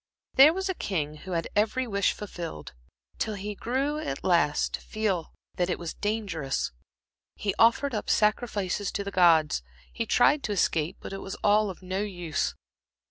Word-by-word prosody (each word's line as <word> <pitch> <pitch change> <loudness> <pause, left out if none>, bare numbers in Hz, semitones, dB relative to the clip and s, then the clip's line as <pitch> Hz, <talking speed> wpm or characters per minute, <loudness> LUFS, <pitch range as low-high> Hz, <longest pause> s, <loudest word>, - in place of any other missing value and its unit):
there 275 +4 +8
was 380 +3 -2
a 380 - 0
king 155 - -2
who 185 +4 -7
had 165 -1 -1
every 220 +5 +2
wish 200 -4 +1
fulfilled, 170 - -7 0.5
till 215 - -1
he 205 +1 -4
grew 270 +8 -1
at 135 - -4
last 170 -4 +2
to - - -3
feel 205 -7 -2 0.3
that 180 0 +1
it 180 - 0
was 170 -2 -5
dangerous; 195 - -2 0.6
he 200 -2 -1
offered 235 +4 +4
up 210 - -3
sacrifices 210 -3 +1
to 200 - -2
the 200 - -5
gods, 165 - +4 0.3
he - - -3
tried 295 0 +4
to 215 - -3
escape 170 -3 +1
but - - -7
it 195 - -5
was 195 - -6
all 210 0 +4
of 190 0 -9
no 185 +1 -2
use. 175 -6 -2
200 Hz, 175 wpm, -27 LUFS, 175-220 Hz, 0.6 s, there